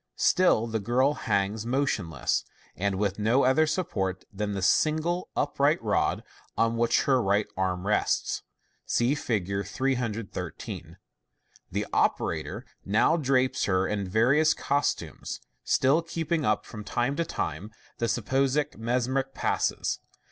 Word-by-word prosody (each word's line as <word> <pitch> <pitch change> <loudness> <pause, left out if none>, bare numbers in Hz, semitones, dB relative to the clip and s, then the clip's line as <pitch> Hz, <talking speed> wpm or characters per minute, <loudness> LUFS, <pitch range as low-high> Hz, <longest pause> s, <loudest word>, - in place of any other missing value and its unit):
Still 180 -11 +4
the 115 -1 -2
girl 125 +7 +2
hangs 100 -3 -1
motionless, 115 - 0 0.3
with 100 +1 -1
no 115 +6 +3
other 130 +5 +4
support 110 - -2
than 105 +1 -2
the 95 -2 -3
single 160 - +2
upright 145 +1 +2
rod 105 -2 +1 0.3
on 115 0 +2
which 120 +1 +2
her 130 -2 +3
right 100 0 +2
arm 95 -1 -1
rests. 105 +1 +1 0.5
(See 120 +3 +2
Fig. 100 -8 -1
313.) 120 -6 -3 0.7
The - - -1
operator - - 0 0.2
now 110 +10 +3
drapes 130 -4 +1
her 95 -1 +1
in 100 -2 -2
various 135 +10 +4
costumes, 140 0 -2 0.2
still 140 +6 +3
keeping 165 -2 -2
up 105 -1 +1
from 105 -1 -8
time 120 +6 -1
to 170 - +2
time 95 - -4 0.3
the 115 - +1
supposed 135 +5 0
mesmeric 130 +3 -1
passes. - - 0
120 Hz, 125 wpm, -27 LUFS, 100-140 Hz, 0.7 s, Still